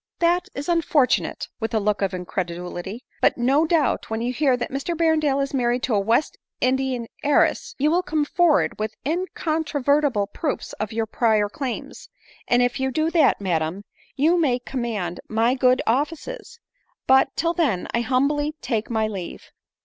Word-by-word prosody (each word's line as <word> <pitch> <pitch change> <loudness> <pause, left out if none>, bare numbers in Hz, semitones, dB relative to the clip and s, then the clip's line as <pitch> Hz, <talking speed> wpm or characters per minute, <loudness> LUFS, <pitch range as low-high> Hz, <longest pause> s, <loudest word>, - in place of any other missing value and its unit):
" - - -59
fhat 350 +2 +2
is 280 +1 -5
unfortunate 320 -6 +1
!" - - -67
(with 225 0 -2
a - - +3
look 210 0 0
of 195 -1 +1
incredulity,). 180 +3 -5
* - - -40
" - - -35
but, - - +3
no 270 +6 +3
doubt, 315 -5 +1
when 220 0 -2
you 240 +2 -2
hear 265 -2 +2
that 245 - -4
Mr 275 +6 -2
Berrendale 310 -4 +2
is 275 - -5
married 245 -1 0
to 255 - 0
a 205 - +3
West 230 +8 +1 0.2
Indian 255 -1 0 0.2
heiress, 290 0 +2
you 295 +3 +2
will 350 +2 +3
come 310 -4 -1
forward 340 -5 +2
with 215 0 -3
incontrovertible 300 - 0
proofs 290 +8 -4
of 215 0 -3
your 225 0 -1
prior 220 -2 +2
claims; 255 +3 -6 0.4
and 245 0 +4
if 245 +2 0
you 265 0 0
do 310 +5 0
that, 320 -5 +4
madam, 175 0 -1 0.3
you 315 +5 +3
maycommand 245 - -1
my 225 +3 +2
good 255 -1 +3
offices: 330 - -2 0.5
—but, 265 +1 +5
till 335 +2 0
then, 280 - 0
I 235 - +1
humbly 290 +5 0
take 230 -4 -2
my 220 -2 0
leave." 195 -5 -7
255 Hz, 175 wpm, -23 LUFS, 220-300 Hz, 0.5 s, but